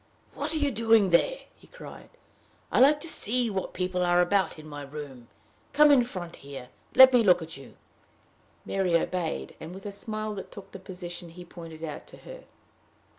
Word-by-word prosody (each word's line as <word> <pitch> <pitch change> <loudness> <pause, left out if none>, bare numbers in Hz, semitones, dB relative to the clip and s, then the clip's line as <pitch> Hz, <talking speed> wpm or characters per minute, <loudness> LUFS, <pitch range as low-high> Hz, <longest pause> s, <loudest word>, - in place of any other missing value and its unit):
"What 305 +3 -3
are - - +1
you 290 -2 +1
doing 225 -4 +3
there?" - - +2
he - - -21
cried. - - -12 0.6
"I - - +2
like 290 +3 +6
to 335 - -5
see 245 -5 +1
what 190 -1 -3
people 180 0 -2
are 175 0 +3
about 190 +1 +1
in 155 - -11
my 145 -1 -8
room. 140 -4 -9 0.5
Come 300 +1 +6
in 265 -4 +6
front 180 -8 -7
here, 135 -3 -10 0.2
and - - -19
let 260 0 +10
me 245 - +6
look 180 -5 +4
at 160 - -9
you." 135 -1 -13 0.9
Mary 190 -3 0
obeyed, 175 -1 -3
and 165 +3 -9
with 195 - -11
a 205 - -4
smile 215 +1 -5
took 200 - -13
the 195 - -9
position 175 -2 -8
he 175 +2 -12
pointed 165 -2 -11
out 155 -2 -7
to - - -14
her. - - -12
185 Hz, 190 wpm, -27 LUFS, 165-230 Hz, 0.9 s, let